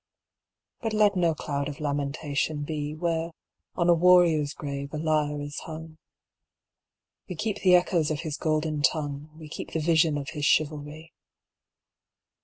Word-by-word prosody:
But 225 -2 -2
let 210 -1 +4
no 170 -3 +2
cloud 140 -1 -3
of 145 - -8
lamentation 145 +1 -2
be 150 0 -4
Where, 165 0 -1 0.5
on 170 - +1
a 175 - +7
warrior's 170 -4 +4
grave, 140 -1 -5
a - - -2
lyre 150 -2 0
is 145 0 -5
hung. 160 0 -9 1.3
We 180 - -4
keep 210 +5 -2
the 180 -2 +6
echoes 175 -3 +2
of 155 -1 -2
his 155 -4 -4
golden 155 0 -1
tongue, 145 +1 0
We 160 -1 -10
keep 150 - -7
the 160 - 0
vision 160 -1 +3
of 140 -1 -5
his 150 -3 -5
chivalry. 155 +1 0
155 Hz, 150 wpm, -27 LUFS, 145-165 Hz, 1.3 s, a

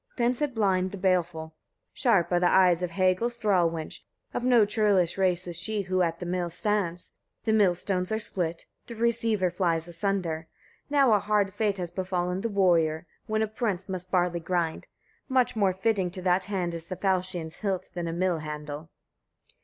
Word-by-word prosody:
Then 240 0 +2
said 270 0 -3
Blind 190 -4 +2
the 200 - -7
Baleful: 175 -4 0
2. - - -33 0.4
Sharp 215 - +2
are 175 - +3
the 175 - +3
eyes 180 -2 +5
of 180 - -1
Hagal's 185 +6 +1
thrall 190 -7 +3
wench; 160 -1 -6 0.3
of - - -2
no 245 -4 +5
churlish 205 -5 +2
race 185 -2 +1
is 170 -2 -3
she 215 +1 -2
who 185 0 0
at 165 -1 0
the 180 - -5
mill 175 0 -1
stands. 180 -2 -1 0.3
The 220 - +2
millstones 185 -2 +1
are 220 - +1
split, 175 -6 -2 0.2
the 235 - -8
receiver 225 -5 +1
flies 170 -2 0
asunder. 175 -2 -2 0.4
Now 275 -5 +4
a 210 - +4
hard 205 -2 +1
fate 205 -1 0
has 175 -2 -4
befallen 180 -1 -2
the 230 - -1
warrior, 170 -5 +2 0.2
when 220 0 +1
a - - 0
prince 210 -4 -2
must 185 -1 -5
barley 175 -2 +1
grind: 170 -1 -2 0.4
much 255 -2 +2
more 200 -3 +3
fitting 190 -1 0
to 185 +1 -7
that 180 +1 +2
hand 185 -4 -2
is 165 0 -6
the 185 - -4
falchion's 185 -3 -1
hilt 195 -4 -3
than 175 -1 -3
a - - -2
mill 175 0 0
handle. 150 0 -6
185 Hz, 185 wpm, -27 LUFS, 175-210 Hz, 0.4 s, eyes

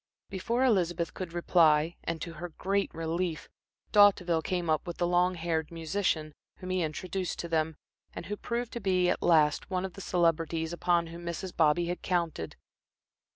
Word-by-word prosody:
Before 235 +7 0
Elizabeth 175 -7 +1
could 185 -3 -6
reply, 165 -2 +3
and 165 -1 -3
to 170 - -6
her 175 +2 -6
great 195 +4 -1
relief, 165 +1 -3 0.4
D'Hauteville 185 -5 +5
came 175 +1 -2
up 155 +3 0
with 175 - -5
the 175 - +1
long 180 +1 +2
haired 165 -2 -2
musician, 165 -2 -1 0.2
whom 185 0 -6
he 185 -1 +1
introduced 180 +3 -3
to 170 - -4
them, 160 -1 0 0.4
and - - -7
who 210 - -3
proved 235 +2 -4
to 235 - -3
be, 185 -3 +2
at - - -2
last, 155 -3 +3
one 185 0 -1
of 190 - -6
the 195 - -9
celebrities 165 -2 0
upon 175 0 +2
whom 170 +1 -9
Mrs. 170 +2 -5
Bobby 160 +2 +3
had 175 +1 -3
counted. 170 - -2
175 Hz, 175 wpm, -29 LUFS, 165-185 Hz, 0.4 s, D'Hauteville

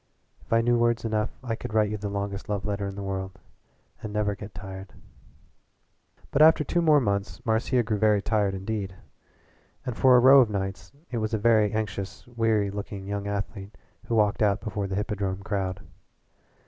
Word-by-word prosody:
"If - - -24
I 115 0 +4
knew 120 0 +2
words 120 0 +1
enough 110 0 0
I 120 -3 -2
could 110 - -7
write 105 -1 +3
you 105 - -2
the 100 0 -4
longest 100 0 -4
love 100 -1 -2
letter 100 -1 -2
in 100 - -6
the 100 - -6
world 95 -1 -4 0.6
and 105 - -6
never 105 -1 0
get 100 0 -10
tired." 95 0 -8 1.4
But 140 - +2
after 155 0 +7
two 175 +4 0
more 155 -3 +5
months 100 -5 -2
Marcia 120 +2 +1
grew 105 -2 -2
very 105 -1 +4
tired 100 -1 0
indeed, 95 -1 -4 0.9
and 125 -3 -3
for 130 +2 +5
a - - +7
row 135 +2 +8
of 120 - +2
nights 95 -3 -4 0.2
it 120 - -1
was 110 +1 -1
a - - +1
very 110 -1 +3
anxious, 100 -3 -4
weary 115 -4 0
looking 100 -1 -6
young 100 0 -3
athlete 100 0 -5 0.3
who 115 - 0
walked 105 -1 +2
out 105 0 +3
before 105 -1 -3
the 95 - -3
Hippodrome 100 -2 -2
crowd. 95 -2 -2
105 Hz, 185 wpm, -26 LUFS, 100-115 Hz, 1.4 s, row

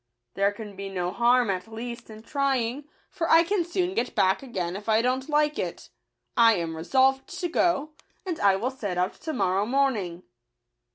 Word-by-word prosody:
There 200 +1 +2
can 205 -1 -9
be 195 0 -6
no 180 -2 -2
harm, 240 -1 +3
at 185 +2 -4
least, 235 +1 -7
in 215 0 -11
trying; 275 -1 -1 0.3
for 330 - -2
I 330 +1 +7
can 370 +1 0
soon 355 +2 -1
get 245 -5 -2
back 190 +1 +3
again 185 -9 -4
if 205 +2 -6
I 220 +1 +4
don't 260 +3 -1
like 300 0 +2
it. - - -5 0.4
I 230 -2 +6
am 165 -3 -3
resolved 265 +10 +2
to 355 - -1
go, 325 -3 +1 0.3
and 350 -4 -3
I 200 -1 +4
will 235 +7 -2
set 205 -9 -4
out 180 +1 0
to 320 - -4
morrow 195 -5 0
morning." 225 -10 0
235 Hz, 185 wpm, -26 LUFS, 195-275 Hz, 0.4 s, I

